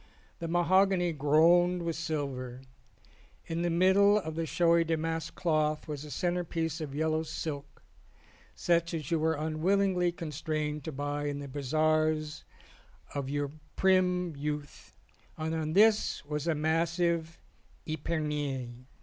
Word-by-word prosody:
The 165 - -4
mahogany 175 +1 +3
groaned 170 +5 +4
with 165 -1 -2
silver. 140 -6 -4 0.8
In 165 +1 -3
the 175 - +1
middle 190 +4 +5
of 160 -6 -3
the 165 0 -2
snowy 170 +1 +3
damask 165 0 -2
cloth 155 -3 0
was 150 -2 -5
a 150 - -9
centrepiece 165 0 -2
of 140 -3 -5
yellow 155 +1 +1
silk 150 -2 -6 0.7
such 170 0 +1
as 155 -2 -5
you 165 - +2
were 160 +1 +1
unwillingly 180 +4 +1
con 165 -2 -6
strained 150 0 -3
to 160 - -3
buy 145 +1 -3
in 145 -1 -2
the 145 0 -6
bazaars 155 +2 0 0.7
of 140 -2 -3
your 145 0 -2 0.2
prim 180 -3 +2
youth 150 0 -6 0.4
and 160 0 -2
on 155 -1 -2
this 215 -3 +3
was 150 +1 -3
a 165 - +2
massive 165 +1 0 0.5
epergne. 145 -6 -3
160 Hz, 130 wpm, -30 LUFS, 150-170 Hz, 0.8 s, middle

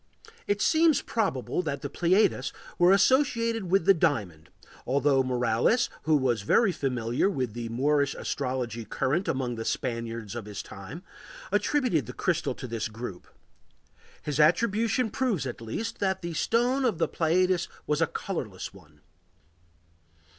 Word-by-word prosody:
It 205 0 +1
seems 320 -2 +4
probable 185 - -1
that 140 -5 -4
the - - -1
Pleiades 175 -7 +2 0.3
were 175 +1 +6
associated 230 -2 +2
with 190 -2 +3
the 195 - +7
diamond, 105 - -1 0.3
although 140 +1 +2
Morales, 125 - +1
who 155 0 +4
was 125 -5 +1
very 195 - +3
familiar 125 - 0
with 130 - -2
the 120 0 -5
Moorish 140 +4 +1
astrology 125 -4 -3
current 150 - -1
among 125 -3 -1
the 115 - -3
Spaniards 115 -3 -3
of 120 -3 -6
his 105 -1 -6
time, 115 - -9 0.5
attributed 240 - +1
the - - -7
crystal - - -1
to - - -7
this 115 -2 -3
group. 110 -4 -8 1.0
His 150 -1 -3
attribution 220 +8 +2
proves 215 - 0
at 120 -2 -6
least 115 - -4
that 190 -2 -1
the 170 -1 -4
stone 245 - +1
of 235 -9 +1
the 165 - +1
Pleiades 180 +2 +1 0.2
was 150 +1 0
a 165 - +4
colorless 115 - -5
one. 75 -6 -18
145 Hz, 145 wpm, -27 LUFS, 120-195 Hz, 1.0 s, the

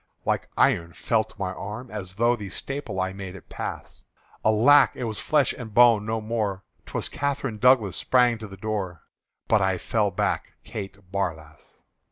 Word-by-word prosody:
Like - - 0
iron 85 0 +2
felt 110 -2 -1
my 95 -2 -2
arm, 105 +7 -7
as 95 -4 -6
through 120 +4 +2
The 100 -3 -7
staple 135 -1 -4
I 95 0 -1
made 95 -1 -7
it 95 - -13
pass: - - -6 0.4
Alack! 125 +7 +6
it - - -5
was 110 -3 -3
flesh 150 -3 +2
and 110 -4 -9
bone 115 -3 +6
no 110 0 0
more! 105 -3 -2 0.2
'T - - -13
was - - +1
Catherine 140 -6 -2
Douglas 115 -6 +4
sprang 125 -3 +3
to 110 - -7
the 95 -1 -11
door, 95 -4 -4 0.4
But 110 -2 +4
I 95 -1 +2
fell 105 +3 0
back 90 - -1
Kate 100 -2 -8
Barlass. 80 -7 -5
105 Hz, 175 wpm, -25 LUFS, 95-115 Hz, 0.4 s, Alack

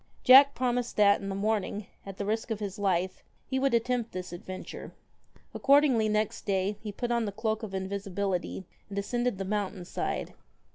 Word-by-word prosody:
iack 275 +2 +9
promised 245 -1 -1
that, 200 -1 +5
in 195 - -4
the 195 - -3
morning, 210 0 -1 0.2
at 195 -1 -7
the 200 - -3
risk 220 +3 -1
of 220 -2 -2
is 205 -1 -5
life, 185 -2 0 0.2
he 265 0 -1
would 270 -2 +2
attempt 235 0 0
this 180 -1 -6
adventure. 185 +2 -8 0.6
Accord 280 +1 +5
ingly 230 -7 +2
next 215 0 0
day 195 +1 +1
he 215 - -5
put 240 +4 -3
on 235 -1 +1
the 205 - -3
cloak 220 +1 -2
of 205 -4 -6
invisibility, 190 -1 -3 0.2
and 200 - -7
ascended 240 +2 -1
the 195 - -3
mountain 200 -2 -2
side. - - -3
210 Hz, 185 wpm, -29 LUFS, 195-235 Hz, 0.6 s, iack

